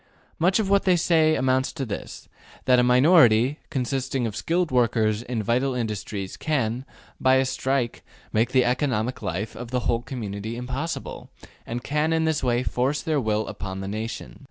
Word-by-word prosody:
Much 180 Hz, +4 st, +3 dB
of 215 Hz, -3 st, 0 dB
what 200 Hz, 0 st, +3 dB
they 185 Hz, -2 st, +5 dB
say 160 Hz, -2 st, +3 dB
amounts 130 Hz, 0 st, +1 dB
to 140 Hz, -4 st, -4 dB
this: 105 Hz, -, -7 dB, 0.4 s
that 125 Hz, -1 st, +5 dB
a -, -, +4 dB
minority, 125 Hz, -1 st, +5 dB
consisting 130 Hz, -1 st, -1 dB
of 110 Hz, -3 st, -4 dB
skilled 170 Hz, +4 st, 0 dB
workers 110 Hz, -3 st, +2 dB
in 120 Hz, -2 st, -3 dB
vital 125 Hz, +4 st, +1 dB
industries, 105 Hz, -4 st, -4 dB
can, 130 Hz, -5 st, -1 dB, 0.3 s
by 130 Hz, 0 st, +4 dB
a 130 Hz, 0 st, +3 dB
strike, 130 Hz, -1 st, -1 dB, 0.3 s
make 115 Hz, +2 st, +2 dB
the 130 Hz, -1 st, +3 dB
economic 125 Hz, -2 st, 0 dB
life 100 Hz, +6 st, -3 dB
of 120 Hz, -, -7 dB
the 125 Hz, 0 st, -1 dB
whole 115 Hz, 0 st, 0 dB
community 110 Hz, -3 st, -5 dB
impossible, 130 Hz, +7 st, -5 dB, 0.4 s
and 120 Hz, +1 st, -4 dB
can 150 Hz, +3 st, 0 dB
in 160 Hz, 0 st, +1 dB
this 160 Hz, -3 st, 0 dB
way 120 Hz, -1 st, +1 dB
force 130 Hz, +4 st, -1 dB
their 155 Hz, -3 st, 0 dB
will 110 Hz, -1 st, 0 dB
upon 95 Hz, -1 st, -6 dB
the 95 Hz, -, -5 dB
nation. 110 Hz, +3 st, -5 dB
125 Hz, 175 wpm, -24 LUFS, 115-140 Hz, 0.4 s, they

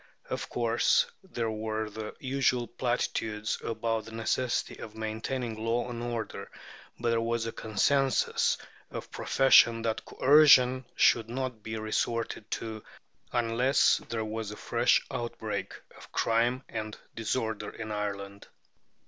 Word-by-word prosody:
Of -, -, -3 dB
course, 120 Hz, -1 st, +3 dB, 0.2 s
there 120 Hz, -12 st, -3 dB
were 110 Hz, 0 st, -2 dB
the 105 Hz, +1 st, -7 dB
usual 130 Hz, -2 st, +1 dB
platitudes 110 Hz, -3 st, -2 dB
about 115 Hz, 0 st, -1 dB
the 115 Hz, -, -10 dB
necessity 115 Hz, +2 st, -1 dB
of 110 Hz, -, -9 dB
maintaining 110 Hz, +1 st, -3 dB
law 115 Hz, +2 st, 0 dB
and 120 Hz, -1 st, -5 dB
order; 120 Hz, -1 st, -4 dB, 0.5 s
but 120 Hz, 0 st, +1 dB
there 115 Hz, 0 st, +2 dB
was 115 Hz, 0 st, -1 dB
a 115 Hz, -, -2 dB
consensus 135 Hz, +6 st, +1 dB, 0.3 s
of -, -, -7 dB
profession 115 Hz, -3 st, +5 dB
that 110 Hz, -1 st, -1 dB
coercion 130 Hz, -3 st, +6 dB
should 115 Hz, -1 st, +4 dB
not 125 Hz, -2 st, -3 dB
be 110 Hz, +1 st, -5 dB
resorted 110 Hz, 0 st, -2 dB
to 110 Hz, -2 st, -4 dB, 0.5 s
unless 120 Hz, +3 st, +3 dB
there 115 Hz, -1 st, -2 dB
was 110 Hz, 0 st, -4 dB
a 105 Hz, -, -6 dB
fresh -, -, +2 dB
outbreak 120 Hz, 0 st, -4 dB, 0.2 s
of -, -, -14 dB
crime 120 Hz, +3 st, +1 dB
and 110 Hz, -1 st, -5 dB, 0.2 s
disorder 110 Hz, -2 st, -2 dB
in 110 Hz, -1 st, -7 dB
Ireland. 100 Hz, -1 st, -4 dB
115 Hz, 130 wpm, -29 LUFS, 110-120 Hz, 0.5 s, coercion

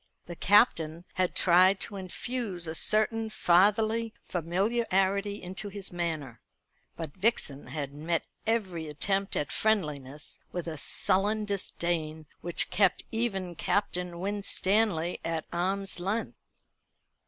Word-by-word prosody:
The 175 Hz, -, -7 dB
Captain 170 Hz, -5 st, +3 dB
had 185 Hz, -1 st, 0 dB
tried 185 Hz, +2 st, +5 dB
to 205 Hz, -, -1 dB
infuse 195 Hz, 0 st, -4 dB
a 160 Hz, -, -3 dB
certain 215 Hz, +6 st, +3 dB
fatherly 215 Hz, +5 st, +3 dB
familiarity 195 Hz, +2 st, 0 dB
into 190 Hz, +3 st, -5 dB
his 200 Hz, -1 st, -6 dB
manner; 155 Hz, -9 st, -3 dB, 0.5 s
but 160 Hz, -4 st, -6 dB
Vixen 185 Hz, -9 st, +1 dB
had 140 Hz, -3 st, -5 dB
met 160 Hz, +3 st, -2 dB, 0.2 s
every 190 Hz, -8 st, -1 dB
attempt 195 Hz, +6 st, -1 dB
at 145 Hz, -, -1 dB
friendliness 150 Hz, -9 st, -1 dB
with 175 Hz, -2 st, -4 dB
a 160 Hz, -, -3 dB
sullen 205 Hz, +8 st, +1 dB
disdain, 170 Hz, -5 st, -2 dB
which 175 Hz, -1 st, 0 dB
kept 195 Hz, -1 st, +2 dB
even 195 Hz, -6 st, -1 dB
Captain 180 Hz, -1 st, -1 dB
Winstanley 200 Hz, -2 st, +1 dB
at 165 Hz, -1 st, -2 dB
arm's 190 Hz, +2 st, -1 dB
length. 200 Hz, +6 st, -2 dB
185 Hz, 115 wpm, -29 LUFS, 165-205 Hz, 0.5 s, tried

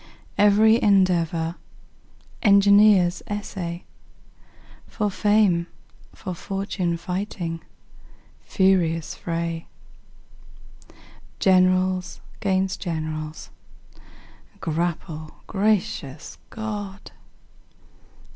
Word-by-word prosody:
Every 215 Hz, +3 st, +5 dB
endeavor 175 Hz, -4 st, +2 dB, 0.8 s
engineers 200 Hz, -3 st, +5 dB
essay, 190 Hz, -4 st, -5 dB, 1.0 s
For 210 Hz, -2 st, -2 dB
fame, 205 Hz, -4 st, +2 dB, 0.5 s
for 185 Hz, -, -6 dB
fortune 195 Hz, -2 st, -3 dB
fighting 180 Hz, -2 st, -4 dB, 0.8 s
furious 175 Hz, -5 st, +1 dB
fray! 165 Hz, -1 st, -4 dB, 1.7 s
Generals 185 Hz, -1 st, +2 dB, 0.2 s
'gainst 190 Hz, -1 st, 0 dB
generals 155 Hz, -3 st, -5 dB, 1.1 s
grapple 160 Hz, -1 st, -3 dB
gracious 190 Hz, -9 st, -1 dB
God! 205 Hz, -3 st, -6 dB
185 Hz, 55 wpm, -23 LUFS, 170-200 Hz, 1.7 s, Every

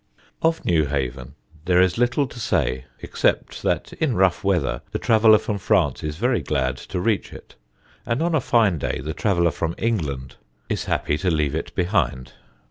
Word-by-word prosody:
Of 165 Hz, 0 st, +1 dB
Newhaven 70 Hz, -6 st, -1 dB, 0.3 s
there 90 Hz, -1 st, +3 dB
is 90 Hz, +2 st, +3 dB
little 120 Hz, +4 st, +2 dB
to 125 Hz, -, -10 dB
say, 65 Hz, -, 0 dB, 0.2 s
except -, -, -1 dB
that -, -, -1 dB
in 145 Hz, -7 st, -1 dB
rough 95 Hz, -1 st, +2 dB
weather 90 Hz, -7 st, 0 dB
the -, -, -1 dB
traveller 110 Hz, -2 st, +5 dB
from 105 Hz, -1 st, -3 dB
France 90 Hz, -9 st, +1 dB
is 75 Hz, -1 st, -3 dB
very 120 Hz, +4 st, +1 dB
glad 65 Hz, -4 st, -1 dB
to -, -, -5 dB
reach 105 Hz, +2 st, 0 dB
it, -, -, -12 dB, 0.5 s
and 115 Hz, +2 st, -1 dB
on 170 Hz, 0 st, 0 dB
a 155 Hz, -, +2 dB
fine 105 Hz, -9 st, +2 dB
day -, -, -2 dB
the 75 Hz, +5 st, -4 dB
traveller 85 Hz, -5 st, +1 dB
from 85 Hz, 0 st, -3 dB
England 75 Hz, -, -2 dB, 0.3 s
is -, -, -2 dB
happy 75 Hz, 0 st, -1 dB
to 95 Hz, -, 0 dB
leave 75 Hz, -4 st, 0 dB
it 80 Hz, -, -4 dB
behind. 90 Hz, -9 st, 0 dB
90 Hz, 175 wpm, -23 LUFS, 75-110 Hz, 0.5 s, traveller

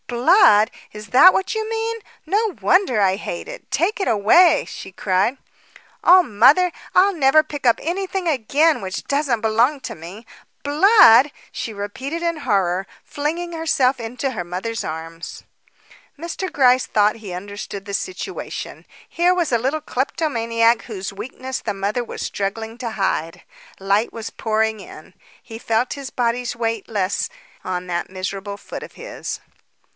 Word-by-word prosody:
"Blood! 245 Hz, -, +5 dB, 0.2 s
is 210 Hz, -1 st, -10 dB
that 310 Hz, -, +8 dB
what 380 Hz, +4 st, -1 dB
you 440 Hz, 0 st, -2 dB
mean. 455 Hz, 0 st, -2 dB, 0.3 s
No 415 Hz, +4 st, 0 dB
wonder 365 Hz, -, +3 dB
I 190 Hz, -2 st, +3 dB
hate 185 Hz, -3 st, -6 dB
it. -, -, -10 dB
Take 395 Hz, +6 st, 0 dB
it -, -, -1 dB
away," 235 Hz, -, +5 dB
she 190 Hz, -, -9 dB
cried. 190 Hz, +7 st, 0 dB, 0.7 s
"Oh, 370 Hz, +1 st, +8 dB
mother, 285 Hz, -, +4 dB, 0.2 s
I'll 390 Hz, +2 st, +5 dB
never 310 Hz, -1 st, +4 dB
pick 290 Hz, -3 st, -8 dB
up 235 Hz, -, +4 dB
anything 375 Hz, +2 st, -3 dB
again 295 Hz, +2 st, +2 dB
which 190 Hz, -1 st, -5 dB
doesn't 280 Hz, -5 st, 0 dB
belong 230 Hz, +6 st, +2 dB
to -, -, -6 dB
me! 180 Hz, +8 st, -11 dB, 0.4 s
Blood!" 295 Hz, -, +6 dB, 0.2 s
she 230 Hz, -, -5 dB
repeated 260 Hz, +11 st, -5 dB
in 335 Hz, -1 st, -1 dB
horror, 195 Hz, -, 0 dB, 0.2 s
flinging 335 Hz, +4 st, -3 dB
herself 280 Hz, -5 st, +1 dB
into 250 Hz, +4 st, -3 dB
her 215 Hz, -8 st, -4 dB
mother's 185 Hz, +6 st, -4 dB
arms. 165 Hz, +1 st, -7 dB, 0.8 s
Mr. 340 Hz, +3 st, -5 dB
Gryce 255 Hz, -4 st, +3 dB
thought 210 Hz, +1 st, +2 dB
he 210 Hz, -4 st, -9 dB
understood 200 Hz, +1 st, -7 dB
the 200 Hz, -, -7 dB
situation. 370 Hz, -, -5 dB, 0.2 s
Here 350 Hz, +1 st, +2 dB
was 345 Hz, -5 st, 0 dB
a 235 Hz, -, +3 dB
little 275 Hz, +6 st, -1 dB
kleptomaniac 235 Hz, -5 st, 0 dB
whose 200 Hz, -3 st, -6 dB
weakness 255 Hz, +5 st, -6 dB
the 210 Hz, -3 st, -3 dB
mother 205 Hz, +5 st, -2 dB
was -, -, -8 dB
struggling 220 Hz, +3 st, -4 dB
to 235 Hz, -3 st, -4 dB
hide. 180 Hz, -4 st, -2 dB, 0.4 s
Light 200 Hz, +3 st, +1 dB
was 225 Hz, -1 st, -6 dB
pouring 220 Hz, -1 st, -1 dB
in. 165 Hz, -1 st, -13 dB, 0.3 s
He 225 Hz, -2 st, -10 dB
felt 230 Hz, +2 st, 0 dB
his 280 Hz, -2 st, -7 dB
body's 245 Hz, 0 st, -1 dB
weight 225 Hz, -3 st, -3 dB
less 200 Hz, -3 st, -1 dB, 0.3 s
on 180 Hz, -1 st, -4 dB
that 175 Hz, -1 st, -3 dB
miserable 195 Hz, +2 st, -5 dB
foot -, -, -8 dB
of -, -, -11 dB
his. -, -, -7 dB
235 Hz, 150 wpm, -21 LUFS, 205-310 Hz, 0.8 s, that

